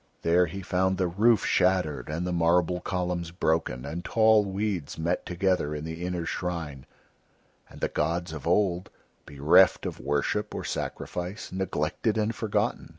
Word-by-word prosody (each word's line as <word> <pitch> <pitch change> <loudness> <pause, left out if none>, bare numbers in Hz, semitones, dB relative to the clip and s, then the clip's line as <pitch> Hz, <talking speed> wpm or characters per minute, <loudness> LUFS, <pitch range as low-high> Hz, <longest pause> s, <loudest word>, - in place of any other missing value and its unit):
There 85 +2 +4
he 95 0 -7
found 95 +1 +1
the 95 - +1
roof 105 +5 +3
shattered 90 -7 +1
and 80 +3 -2
the 90 - -2
marble 85 +1 +2
columns 90 -2 -2
broken 80 -7 -1
and 80 +5 -5
tall 110 0 +4
weeds 95 -5 -3
met 85 +3 -1
together 90 -4 0
in 75 - -5
the 80 +2 -6
inner 90 -2 -2
shrine, 80 -8 -4 0.8
and - - -14
the - - +2
gods 85 +2 -2
of 75 0 -6
Old, 90 0 +1 0.4
bereft 70 +1 +4
of - - -4
worship 75 +10 -1
or - - -4
sacrifice, 90 +4 -5
neglected 95 +3 -1
and 110 +1 0
forgotten. 110 -3 -1
90 Hz, 150 wpm, -27 LUFS, 80-95 Hz, 0.8 s, There